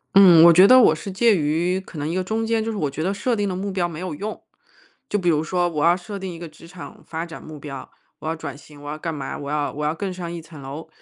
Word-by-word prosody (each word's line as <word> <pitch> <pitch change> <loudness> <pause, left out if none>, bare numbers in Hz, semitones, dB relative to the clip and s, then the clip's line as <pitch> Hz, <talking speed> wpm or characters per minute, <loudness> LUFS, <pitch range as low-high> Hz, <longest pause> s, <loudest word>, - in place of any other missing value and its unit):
嗯， 180 -4 +9
我 170 0 +9
觉 185 +4 +8
得 255 +4 +8
我 220 - +6
是 175 +5 -6
介 220 +3 +4
于 165 +3 0
可 185 -3 -12
能 145 0 -3
一 165 - -2
个 185 +1 0
中 220 +4 -2
间， 225 -1 0
就 225 - -3
是 215 - -5
我 155 - 0
觉 140 +3 -5
得 185 +4 0
设 235 +5 -1
定 205 -2 -1
的 185 - -3
目 195 +2 -3
标 185 -2 0
没 160 -2 -8
有 180 -2 -4
用。 205 +8 -5 0.7
就 - - 0
比 185 -4 0
如 155 -2 +2
说 175 +2 0
我 150 -3 -1
要 170 +1 +5
设 200 +3 -7
定 190 -2 -5
一 165 - -10
个 170 - -7
职 155 +2 -16
场 170 +1 -11
发 165 0 -4
展 165 -1 -10
目 155 -1 -10
标、 135 -2 -8 0.3
我 - - -9
要 160 - -1
转 160 -4 -7
型、 145 0 -15
我 145 - -6
要 155 - -5
干 165 0 -4
嘛、 140 -2 -5
我 140 - -7
要 145 -1 -1
我 150 +1 -4
要 150 +1 0
更 190 +3 -4
上 175 -2 -6
一 170 -1 -6
层 155 -2 -13
楼。 140 +4 -8
170 Hz, 325 characters per minute, -22 LUFS, 155-190 Hz, 0.7 s, 嗯